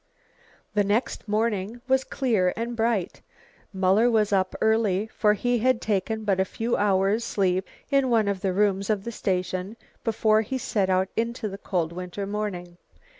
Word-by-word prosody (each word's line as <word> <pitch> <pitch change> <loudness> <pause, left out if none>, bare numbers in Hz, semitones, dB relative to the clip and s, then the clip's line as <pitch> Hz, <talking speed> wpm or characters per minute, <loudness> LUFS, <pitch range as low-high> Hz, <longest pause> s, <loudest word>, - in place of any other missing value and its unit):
The 205 -1 +3
next 210 +4 -1
morning 215 +1 -1
was 265 0 +3
clear 215 -12 +1
and 235 +1 -3
bright. 225 -5 -1 0.5
Muller 195 +5 +3
was 215 -3 +2
up 185 -1 +1
early, 220 -3 +2
for 210 -1 +3
he 245 +3 0
had 255 +1 +2
taken 220 +1 -1
but 195 -3 +1
a - - +4
few 230 +5 -2
hours 200 +2 +2
sleep 190 -3 0 0.2
in 275 -2 +3
one 225 -3 +3
of 200 -2 -1
the 190 - 0
rooms 195 0 +1
of 210 -3 0
the 235 - -5
station, 185 0 -2 0.3
before 220 -1 +3
he 260 +5 -3
set 205 -6 -1
out 185 +1 +2
into 230 0 -2
the 195 -1 -7
cold 175 -5 -1
winter 180 +3 -5
morning. 195 -4 -4
210 Hz, 170 wpm, -25 LUFS, 190-225 Hz, 0.5 s, a